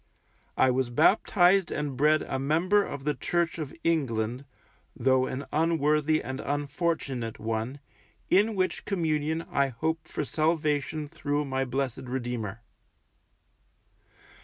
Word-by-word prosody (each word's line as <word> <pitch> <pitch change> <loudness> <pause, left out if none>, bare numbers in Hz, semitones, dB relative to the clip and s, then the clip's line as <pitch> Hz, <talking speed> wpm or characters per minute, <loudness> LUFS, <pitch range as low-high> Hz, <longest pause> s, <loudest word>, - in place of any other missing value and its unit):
I 130 - +5
was 130 -1 0
baptized 180 - +4
and 145 -3 -2
bred 150 +3 +3
a 135 - -3
member 170 +9 +2
of 140 -6 -6
the 150 +1 +1
Church 170 +4 -1
of 150 -3 -4
England 125 -6 0 0.5
(though 130 +1 +2
an 135 +2 -4
unworthy 155 -1 +2
and 130 0 -5
unfortunate 140 -4 -2
one) 115 +5 -3 0.5
in 210 +3 +3
which 185 -1 -1
Communion 160 -3 0
I 140 0 +2
hope 160 +6 -3
for 150 - -3
salvation 155 -1 0
through 145 -2 -2
my 135 -1 -1
blessed 130 0 -3
Redeemer. 120 -4 -4
145 Hz, 120 wpm, -28 LUFS, 130-160 Hz, 0.5 s, I